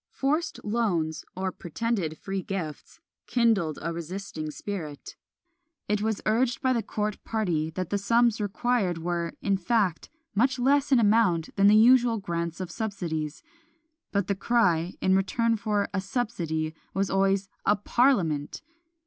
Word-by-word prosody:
Forced 300 +5 -1
loans, 190 -8 0
or 190 0 -2
pretended 175 -2 -3
free 195 0 -4
gifts, 175 -6 -6 0.3
kindled 220 -10 +2
a 170 +1 -2
resisting 170 -1 -5
spirit. 155 -4 -6 0.7
It 210 0 0
was 220 -1 -1
urged 235 +3 +2
by 260 -1 +2
the 235 - +1
court 210 0 -3
party, 175 -9 -1
that 175 +2 -5
the 205 - +1
sums 230 +2 +3
required 205 -3 0
were, 170 0 -2
in 195 -1 +2
fact, 190 -2 0 0.2
much 255 +5 +2
less 280 +3 +2
in 265 - +6
amount 205 -7 +2
than 200 0 +5
the 210 - +7
usual 240 +1 +6
grants 170 -3 -3
of 185 -2 -5
subsidies; 170 -8 -4 0.7
but 200 -2 +1
the 200 - 0
cry, 190 -5 +1
in 190 0 +3
return 230 +4 +1
for 205 -1 0
"a 190 - 0
subsidy," 175 -8 -2 0.2
was 195 -1 0
always 195 0 +2 0.2
"a 205 - +5
Parliament!" 200 - +1
200 Hz, 145 wpm, -27 LUFS, 170-230 Hz, 0.7 s, the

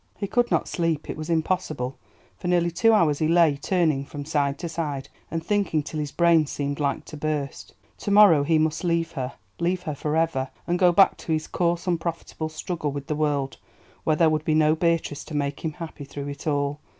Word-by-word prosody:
He 200 - -2
could 240 +4 +1
not - - +1
sleep, 165 -3 -1
it - - -6
was 155 +1 -6
impossible. 160 -6 -1 0.4
For 175 - -6
nearly 175 -1 +2
two 225 +7 +4
hours 165 -9 +3
he 155 - +2
lay 165 -3 +4
turning 155 -2 +1
from 145 0 -7
side 145 -2 0
to 170 - -4
side, 150 -5 -4 0.2
and 165 -1 -4
thinking 200 -7 +1
till 155 +1 -5
his 145 -2 -3
brain 170 -3 +4
seemed 140 0 -3
like 140 -2 -1
to 155 - -9
burst. 145 -2 -3 0.2
To - - -4
morrow 200 -7 +7
he 160 +3 +2
must 155 +1 0
leave 170 -1 0
her, 130 -3 -4 0.3
leave 180 +1 0
her 155 -4 -3
for 150 +2 -2
ever, 150 -5 0 0.2
and 175 +1 0
go 180 -2 +6
back 195 +3 +5
to - - -6
his 155 0 -1
coarse 175 0 0
unprofitable 165 -2 -3
struggle 155 -1 -3
with 140 0 -5
the 150 - -2
world, 145 -3 -1 0.4
where 155 - +2
there 160 0 +4
would 155 -1 0
be 155 -1 +1
no 155 0 +4
Beatrice 165 -3 0
to 155 - -7
make 140 -1 -1
him 160 -2 -2
happy 160 -2 -8
through 140 +1 -6
it 140 +2 -7
all. 145 0 0
155 Hz, 215 wpm, -25 LUFS, 145-170 Hz, 0.4 s, morrow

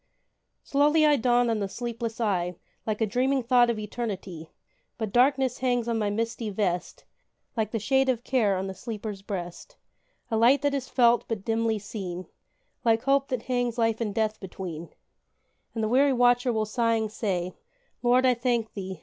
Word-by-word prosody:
Slowly 295 +2 +3
I 300 -1 +5
dawn 245 -1 +2
on 225 -2 0
the 200 -1 -2
sleepless 230 0 -5
eye, 180 -5 0 0.3
Like 215 0 -2
a - - +4
dreaming 255 +4 +1
thought 240 0 +4
of 235 - 0
eternity; 200 -7 -5 0.5
But 220 -3 -3
darkness 260 0 +3
hangs 245 -2 0
on 230 -1 0
my 210 -1 0
misty 225 +1 -2
vest, 190 -3 -2 0.5
Like 220 -3 0
the 225 - -2
shade 265 +5 +2
of 240 -2 0
care 220 -8 +2
on 190 - -2
the 190 - -4
sleeper's 210 -1 -6
breast; 175 -3 -6 0.6
A 225 - +1
light 255 +6 +4
that 285 -1 +2
is 270 -2 -3
felt 240 -2 +4
but 215 -4 -4
dimly 225 -1 +1
seen, 190 -3 -6 0.6
Like 225 -1 +3
hope 275 0 +2
that 255 -3 -3
hangs 245 -2 -1
life 225 -1 +1
and 215 -3 -1
death 215 -1 0
between; 175 -4 -7 0.9
And 225 - -1
the - - +1
weary 270 +4 +4
watcher 245 0 +3
will 220 -2 0
sighing 225 0 +1
say, 185 -5 -2 0.5
"Lord, 250 +1 +4
I 255 - +5
thank 235 -2 -1
thee! 190 -3 -6
230 Hz, 175 wpm, -27 LUFS, 205-245 Hz, 0.9 s, I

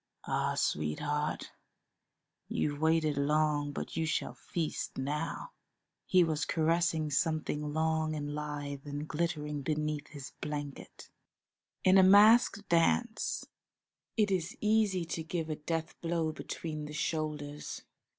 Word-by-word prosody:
Ah, - - 0
sweetheart, 145 - -1 1.0
you've 145 0 -1
waited 160 -2 +3
long, 150 0 +2
but - - -5
you 160 0 0
shall - - -1
feast 165 -3 -4
now!" 150 - -3 0.6
He 185 -1 +6
was 155 -2 0
caressing 160 -1 +1
something 150 -1 0
long 160 0 +1
and 145 -1 -3
lithe 145 -1 -5
and 145 +1 -4
glittering 150 -2 -2
beneath 150 +1 -2
his 140 -3 -9
blanket. 145 -2 -6 0.7
In 190 +1 +7
a - - +8
masked 205 +2 +6
dance 195 +7 +1 0.7
it 210 -2 +3
is 190 +6 -1
easy 210 -4 +2
to 165 0 -3
give 160 0 -3
a - - -1
death 165 +2 -3
blow 165 -2 0
between 155 -1 -5
the 150 - -7
shoulders. 150 -2 -3
155 Hz, 120 wpm, -32 LUFS, 150-170 Hz, 1.0 s, a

